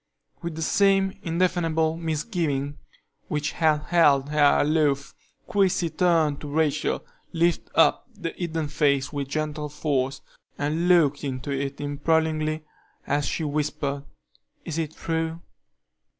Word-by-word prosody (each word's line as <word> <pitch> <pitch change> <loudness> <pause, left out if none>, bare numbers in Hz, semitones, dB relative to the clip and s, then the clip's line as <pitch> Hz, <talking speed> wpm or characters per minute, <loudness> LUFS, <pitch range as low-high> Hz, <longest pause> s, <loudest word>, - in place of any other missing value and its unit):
With 170 -2 -4
the 160 - -3
same 195 +2 +3
indefinable 165 -2 +1
misgiving 155 -4 -2 0.5
which 150 0 -1
had 155 -2 +2
held 145 -5 +4
her 150 -1 +4
aloof, 145 -2 +1 0.3
Christie 185 -4 +1
turned 165 -5 +2
to 150 - -6
Rachel, 150 0 0 0.3
lifted 170 0 +1
up 165 - +4
the 185 -7 -5
hidden 165 -3 -3
face 145 -2 +1
with 140 -2 -3
gentle 150 +1 -3
force, 140 -2 -1 0.4
and 155 +4 0
looked 160 -6 +4
into 135 0 -4
it 140 0 -3
imploringly, 155 +1 0 0.4
as 145 +1 0
she 165 - -2
whispered: 145 -1 -2 0.6
"Is 165 0 -3
it 160 -1 -3
true?" 165 0 -2
155 Hz, 120 wpm, -25 LUFS, 145-165 Hz, 0.6 s, held